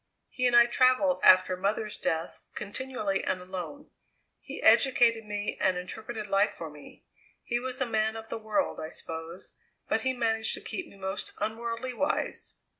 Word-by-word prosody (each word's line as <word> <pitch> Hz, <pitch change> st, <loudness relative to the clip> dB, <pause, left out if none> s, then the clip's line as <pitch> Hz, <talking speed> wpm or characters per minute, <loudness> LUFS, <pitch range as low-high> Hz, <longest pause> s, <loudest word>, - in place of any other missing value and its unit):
He 250 Hz, -1 st, +1 dB
and 240 Hz, -, +3 dB
I 240 Hz, 0 st, +9 dB
travelled 255 Hz, +3 st, +3 dB
after 185 Hz, 0 st, +6 dB
mother's 205 Hz, +3 st, -1 dB
death 160 Hz, +1 st, -2 dB
continually, 210 Hz, -3 st, -2 dB
and 185 Hz, -, -1 dB
alone. 185 Hz, -, -7 dB, 0.5 s
He -, -, -8 dB
educated 235 Hz, -4 st, +5 dB
me 205 Hz, 0 st, -3 dB
and 185 Hz, -1 st, +3 dB
interpreted 215 Hz, +4 st, -6 dB
life 195 Hz, +2 st, +2 dB
for 160 Hz, -2 st, -7 dB
me; 150 Hz, -1 st, -14 dB, 0.4 s
he 240 Hz, 0 st, -1 dB
was 255 Hz, 0 st, -4 dB
a 265 Hz, -, +2 dB
man 220 Hz, -1 st, 0 dB
of 225 Hz, 0 st, -7 dB
the -, -, -4 dB
world, 225 Hz, +7 st, -1 dB
I 155 Hz, -, -5 dB
suppose, 165 Hz, +2 st, -8 dB, 0.3 s
but -, -, +1 dB
he 260 Hz, 0 st, +1 dB
managed 225 Hz, -2 st, 0 dB
to -, -, -9 dB
keep 365 Hz, -3 st, -5 dB
me -, -, -16 dB
most 190 Hz, +1 st, -4 dB
unworldly 235 Hz, +3 st, -3 dB
wise. 285 Hz, +5 st, -1 dB
220 Hz, 170 wpm, -29 LUFS, 190-245 Hz, 0.5 s, I